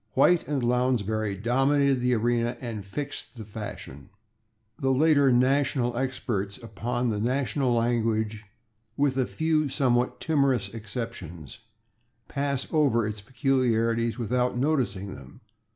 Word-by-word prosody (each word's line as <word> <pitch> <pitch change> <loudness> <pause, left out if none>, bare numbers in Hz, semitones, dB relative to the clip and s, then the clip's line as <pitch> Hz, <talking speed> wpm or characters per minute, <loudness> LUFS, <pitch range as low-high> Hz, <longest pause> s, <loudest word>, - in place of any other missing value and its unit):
White 170 +6 +4
and 140 -4 -1
Lounsbury 110 -4 0
dominated 135 +5 +2
the 125 0 +2
arena 120 +1 0
and 115 -5 -5
fixed 125 +3 -6
the 110 - -7
fashion. 100 -9 -8 0.7
The 135 - 0
later 140 0 +4
national 130 -1 +2
experts 120 -6 -2
upon 120 +1 -2
the 105 - -2
national 125 +2 0
language, 110 -2 0 0.5
with 140 -2 +2
a 130 -2 +1
few 155 -2 0
somewhat 125 -2 +1
timorous 140 -9 +1
exceptions, 110 - -7 0.7
pass 140 -1 -1
over 135 -8 +3
its 105 -1 -4
peculiarities 115 -2 +1
without 125 +1 0
noticing 125 -9 0
them. 70 -2 -13
120 Hz, 120 wpm, -27 LUFS, 110-135 Hz, 0.7 s, White